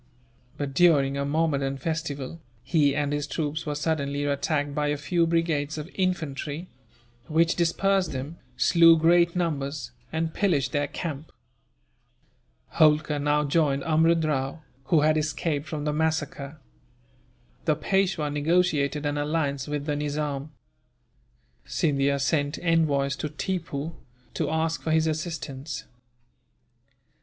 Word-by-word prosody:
But, 140 -2 -3
during 140 -4 +4
a 140 - -1
Mahommedan 140 -2 0
festival, 160 0 -4 0.2
he 145 -3 +2
and 145 0 0
his 145 0 -2
troops 155 0 -3
were 150 - -1
suddenly 145 -2 -1
attacked 145 0 0
by 150 +1 0
a 145 0 0
few 165 +3 +1
brigades 160 -3 0
of 155 +3 -6
infantry; 165 -3 -2 0.6
which 165 +1 +3
dispersed 185 +2 +1
them, 140 +5 -6 0.2
slew 165 -1 +6
great 170 +2 +4
numbers, 140 -7 -2 0.2
and 160 0 -2
pillaged 175 -10 +1
their 145 -2 0
camp. 155 -2 -6 1.5
Holkar 155 -1 +4
now 145 +1 +2
joined 140 -2 +1
Amrud 165 +1 +3
Rao, 145 +1 -2 0.2
who 155 +1 +3
had 155 +1 +3
escaped 155 0 -1
from 150 -2 -4
the 150 - 0
massacre. 155 -2 -2 1.1
The 155 - +3
Peishwa 180 -2 0
negotiated 150 -2 +1
an 145 0 -1
alliance 145 -3 -1
with 145 -1 -3
the 150 -1 -1
Nizam. 145 -1 -2 1.1
Scindia 140 -2 +1
sent 145 +1 0
envoys 145 -5 +2
to 150 - -3
Tippoo, 160 -1 -3 0.4
to 155 - -1
ask 160 +1 0
for - - -4
his 160 0 +3
assistance. 155 -3 -4
150 Hz, 125 wpm, -26 LUFS, 145-165 Hz, 1.5 s, slew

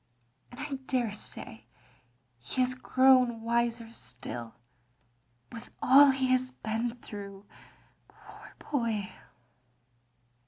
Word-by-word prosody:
And 245 - -13
I 295 -1 -5
daresay 215 - -4 0.7
he 190 - -3
has 255 0 +2
grown 255 -2 +3
wiser 235 0 -1
still, 120 - -8 1.0
with 230 - -10
all 280 +2 +7
he 265 -1 +1
has 255 0 +2
been 230 -1 -3
through, 200 -1 -9 0.7
poor - - -15 0.2
boy." 230 -8 -1
235 Hz, 90 wpm, -29 LUFS, 210-255 Hz, 1.0 s, all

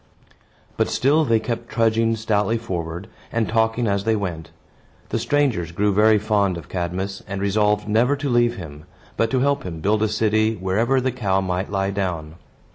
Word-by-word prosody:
But - - +1
still 150 +4 +2
they 115 -4 +3
kept 115 +1 -4
trudging 115 0 +2
stoutly 110 0 0
forward, 90 -4 -5 0.2
and 115 -1 0
talking 110 +1 +1
as 100 -2 0
they 110 +1 +2
went. 85 -6 -4 0.6
The 115 - -1
strangers 120 - 0
grew 100 +4 +1
very 110 +2 +5
fond 100 -3 +1
of 85 - -10
Cadmus, 95 +2 -3
and 100 +1 -4
resolved 105 +1 +1
never 115 +6 +3
to 145 0 -4
leave 120 -1 +2
him, 75 -5 -9 0.3
but 115 - +1
to 130 +1 +1
help 140 +1 +1
him 85 -9 -6
build 105 +5 +1
a 110 - +3
city 110 +1 +1
wherever 110 +8 +1
the 130 0 0
cow 100 -6 0
might 95 0 -2
lie 95 -1 -1
down. 90 -6 -3
105 Hz, 180 wpm, -22 LUFS, 95-115 Hz, 0.6 s, very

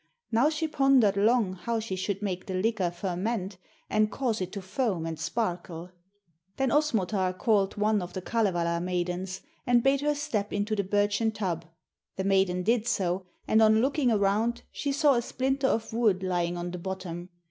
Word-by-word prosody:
Now 235 +6 +4
she 320 +1 -1
pondered 270 -9 +4
long 215 -1 +3
how 230 +5 -2
she 215 -4 -4
should 195 +2 -3
make 185 -3 -3
the 190 - -3
liquor 195 -1 +1
ferment 185 +3 -3 0.3
and 215 0 +2
cause 235 -6 -1
it 185 0 -3
to 200 - -4
foam 185 -3 -1
and 165 -1 -4
sparkle. 175 -1 -3 0.7
'Then 270 -2 +1
Osmotar 205 -10 +1
called 200 -3 +1
one 210 0 +2
of 180 0 -7
the 185 - -4
Kalevala 175 -7 0
maidens 180 +1 -2 0.3
and 240 -1 +4
bade 275 +1 +3
her 295 0 +1
step 235 -9 -2
into 205 +2 -1
the 200 - 0
birchen 205 +3 +1
tub. 180 -6 -3 0.5
The 190 - -2
maiden 190 -2 +2
did 230 +2 +1
so, 185 -2 -1 0.2
and 220 - +4
on 220 0 +6
looking 270 +1 +2
around 215 +3 +1
she 285 - -2
saw 285 +1 +4
a 240 - +2
splinter 265 +3 0
of 225 -3 -1
wood 215 -5 +2
lying 175 -1 -1
on 175 0 -4
the 180 - -6
bottom. 180 -1 -5
205 Hz, 180 wpm, -28 LUFS, 185-235 Hz, 0.7 s, on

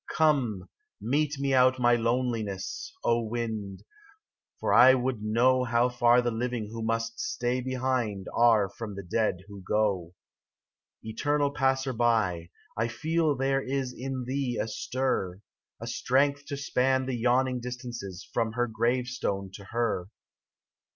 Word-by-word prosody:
33 - - -6
COME, 130 -12 +1 0.3
mete 145 +3 0
me 140 -1 0
out 130 0 +5
my 120 -1 +4
loneliness, 115 -5 -2
o 120 0 +2
wind, 110 -4 -4 0.8
For - - 0
I 130 +2 +8
would 125 -3 -2
know 125 +4 +3
How 120 0 +2
far 120 0 +4
the 120 - 0
living 115 -2 -3
who 115 0 -6
must 115 +1 -2
stay 125 - -1
behind 125 -6 -1
Are 115 -4 +4
from 105 +1 -7
the 100 - -6
dead 95 0 0
who 100 -1 -10
go. 95 -3 0 0.9
Eternal 145 +6 0
Passer 135 -2 0
by, 110 -8 +1 0.3
I 110 +2 0
feel 155 +5 0
there 135 +1 +1
is 130 -1 -2
In 130 0 -4
thee 130 -1 -2
a 105 - -1
stir, 110 -6 -2 0.4
A 115 - -6
strength 140 +4 +1
to 140 - -4
span 130 -1 +1
the 130 -1 -2
yawning 125 +2 +1
distances 120 -6 -7
From 115 -2 0
her 120 0 +1
grave 120 +2 0
stone 100 -6 -3
to 100 - -10
her. 115 -5 -1
120 Hz, 145 wpm, -28 LUFS, 110-130 Hz, 0.9 s, I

